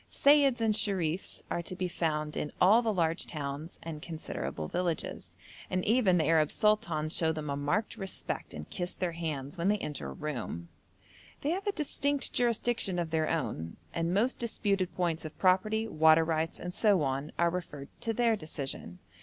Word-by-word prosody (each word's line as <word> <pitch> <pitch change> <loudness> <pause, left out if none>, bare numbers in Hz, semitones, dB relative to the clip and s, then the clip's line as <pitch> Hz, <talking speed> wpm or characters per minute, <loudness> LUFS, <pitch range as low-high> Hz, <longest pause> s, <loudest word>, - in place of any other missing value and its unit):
Seyyids 280 -3 +5
and 220 -1 +3
Sherifs 190 -5 0
are 170 - 0
to 185 - -6
be 180 0 -1
found 155 -3 -1
in 150 - -2
all 210 +6 +6
the 225 -2 +1
large 165 -3 0
towns 150 +1 -5
and 160 -2 -6
considerable 80 - -5
villages, 175 - -3 0.3
and 185 0 -1
even 210 -5 +4
the 160 - +2
Arab 155 -1 +4
sultans 170 -7 +1
show 160 -1 +2
them 155 -2 -4
a - - -1
marked 160 +10 -1
respect 195 -1 -3
and 75 0 -7
kiss 180 0 -3
their 180 -2 -1
hands 155 -3 -4
when 170 - +1
they 210 +1 +3
enter 145 - -4
a - - -6
room. 110 - -5 0.7
They 290 - 0
have 385 +4 -2
a - - +3
distinct 285 -4 0
jurisdiction 235 -5 +1
of 170 -2 -2
their 160 -1 +1
own, 85 - -2 0.2
and 170 0 0
most 220 +8 +1
disputed 200 -5 0
points 170 -2 0
of 155 - -8
property, 215 +4 +3
water 160 -3 +5
rights, 160 0 -1
and 180 0 -5
so 200 -6 +3
on, 135 +2 -2
are 170 0 +3
referred 150 -6 -5
to 230 - 0
their 230 0 +3
decision. 140 - -6
170 Hz, 180 wpm, -31 LUFS, 155-210 Hz, 0.7 s, all